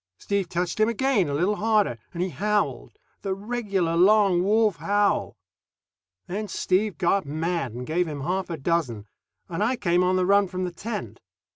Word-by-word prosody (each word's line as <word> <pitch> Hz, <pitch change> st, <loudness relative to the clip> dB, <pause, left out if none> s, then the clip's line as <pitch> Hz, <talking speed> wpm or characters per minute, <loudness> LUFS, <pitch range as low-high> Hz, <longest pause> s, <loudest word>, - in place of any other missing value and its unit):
Steve 200 Hz, -3 st, -2 dB
touched 175 Hz, +3 st, -2 dB
him 215 Hz, +1 st, +4 dB
again, 235 Hz, -, +1 dB
a 140 Hz, -, -1 dB
bit 190 Hz, +7 st, +1 dB
harder, 210 Hz, -, +2 dB
and 175 Hz, 0 st, -2 dB
he 185 Hz, -, -2 dB
howled 210 Hz, +3 st, -1 dB, 0.2 s
the 195 Hz, -2 st, -2 dB
regular 200 Hz, -5 st, -1 dB
long 195 Hz, 0 st, +5 dB
wolf 210 Hz, 0 st, +2 dB
howl. 205 Hz, +6 st, 0 dB, 0.9 s
Then 210 Hz, +4 st, -4 dB
Steve 195 Hz, -1 st, 0 dB
got 190 Hz, +4 st, +2 dB
mad 155 Hz, -3 st, -2 dB
and 125 Hz, +1 st, -6 dB
gave 175 Hz, +4 st, 0 dB
him 145 Hz, -3 st, -5 dB
half 180 Hz, +5 st, -2 dB
a 165 Hz, -, -3 dB
dozen, 135 Hz, -8 st, -1 dB, 0.4 s
and 185 Hz, +3 st, -2 dB
I 245 Hz, +4 st, +1 dB
came 180 Hz, -5 st, +1 dB
on 185 Hz, +1 st, +2 dB
the 185 Hz, -1 st, +2 dB
run 200 Hz, +1 st, +4 dB
from 185 Hz, +1 st, -4 dB
the 180 Hz, -, -2 dB
tent. 190 Hz, -, -6 dB
185 Hz, 175 wpm, -25 LUFS, 170-205 Hz, 0.9 s, long